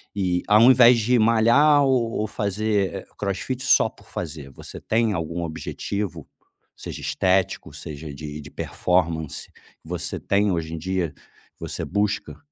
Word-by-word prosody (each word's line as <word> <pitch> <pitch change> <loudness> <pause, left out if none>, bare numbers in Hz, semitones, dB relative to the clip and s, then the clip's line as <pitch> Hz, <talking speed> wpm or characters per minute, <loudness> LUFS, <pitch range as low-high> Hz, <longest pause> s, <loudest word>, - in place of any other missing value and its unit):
E, 90 -3 0
ao 105 +1 +6
invés 125 -1 +7
de 120 +3 +2
malhar 115 +7 +5
ou 125 -4 +2
ou 110 - -1
fazer 105 -2 -1
CrossFit 105 +6 -3
só - - +4
por - - -22
fazer, 75 -5 -6
você - - -10
tem 110 -1 +1
algum 85 0 -3
objetivo, 85 +2 -4 0.5
seja - - -8
estético, 95 +6 0
seja 75 0 -8
de 75 +1 -7
de 75 - -12
performance, 85 -4 -1 0.3
você 85 +1 -4
tem, 100 0 +1
hoje 80 -2 -2
em - - -3
dia, 90 -1 -2 0.4
que - - -43
você - - -4
busca? 100 0 -1
95 Hz, 145 wpm, -23 LUFS, 80-110 Hz, 0.5 s, invés